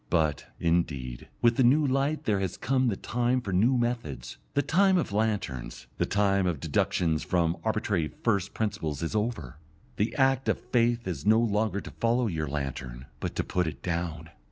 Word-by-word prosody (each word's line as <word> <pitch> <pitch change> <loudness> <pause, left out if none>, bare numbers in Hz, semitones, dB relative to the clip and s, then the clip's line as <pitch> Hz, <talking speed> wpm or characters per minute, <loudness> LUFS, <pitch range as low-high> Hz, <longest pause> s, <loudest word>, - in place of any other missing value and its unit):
But, 80 -5 +1
indeed, 75 -8 -1 0.2
with 120 -1 +4
the 130 - +5
new 145 +5 +5
light 140 +3 0
there 105 -2 +1
has 95 -1 -2
come 130 +1 +1
the 110 - +1
time 120 +4 0
for 100 -6 -4
new 115 +8 +4
methods; 115 - -3 0.2
the 145 - +3
time 190 +6 +4
of 170 - -1
lanterns, 105 - -2
the - - +1
time 100 -2 +2
of 85 -5 -1
deductions 80 +2 +1
from 85 -2 +1
arbitrary 105 -7 0
first 100 -2 -1
principles 100 -9 -2
is 85 - -3
over. 105 - -2 0.4
The 105 +3 0
act 135 -1 +2
of - - +2
faith 120 -1 +1
is 90 +2 -4
no 110 +1 +6
longer 105 -3 +1
to - - -9
follow 120 +2 +1
your 80 -7 -2
lantern, 65 -3 -4
but - - -4
to - - 0
put 90 -2 0
it 80 - -6
down. 85 -2 -3
100 Hz, 180 wpm, -28 LUFS, 80-120 Hz, 0.4 s, no